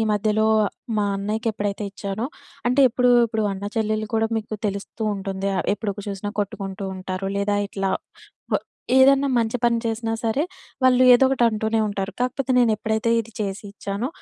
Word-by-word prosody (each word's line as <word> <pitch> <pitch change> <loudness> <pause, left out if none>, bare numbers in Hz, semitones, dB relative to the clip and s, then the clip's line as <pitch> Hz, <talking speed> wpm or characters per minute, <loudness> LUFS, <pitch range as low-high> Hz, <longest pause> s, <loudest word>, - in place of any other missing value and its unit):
మధ్యలో, 215 +1 +2 0.5
మా 205 - +2
అన్నయ్యకెప్పుడైతే 210 0 -2
ఇచ్చానో, 200 +3 -3 0.4
అంటే 250 +3 +3
ఎప్పుడు 250 +1 +3 0.2
ఇప్పుడు 220 -1 -1
అన్నాచెల్లెల్లు 215 +2 -2
కూడా 225 0 +2
మీకు 215 0 -5
తెలుస్తూ 200 +3 -6
ఉంటుంది 195 0 -3
ఆహ్, - - -1
ఎప్పుడు 210 -1 -3
కు 205 - -6
చూసినా 200 +1 -4
కొట్టుకుంటూ 195 -1 -4
ఉంటారు. 185 +1 -4
లేదా 205 0 +1
ఇట్లా 195 -1 -2 0.7
ఆహ్, - - -6 0.3
ఏదన్నా 275 +1 +6
మంచి 230 0 +1
పని 235 -1 +3
చేసినా 225 0 -1
సరే, 230 +5 +1 0.4
వాళ్ళు 255 0 +5
ఏదోకటంటూనే 235 -4 +3
ఉంటారు. 200 -1 -3
కాకపోతే 255 +1 -1
నేనెప్పుడైతే 220 -1 +1
ఇది 230 0 -10
చేసి 200 -1 -3
ఇచ్చానో, 200 +4 -3
215 Hz, 145 wpm, -23 LUFS, 200-230 Hz, 0.7 s, ఏదన్నా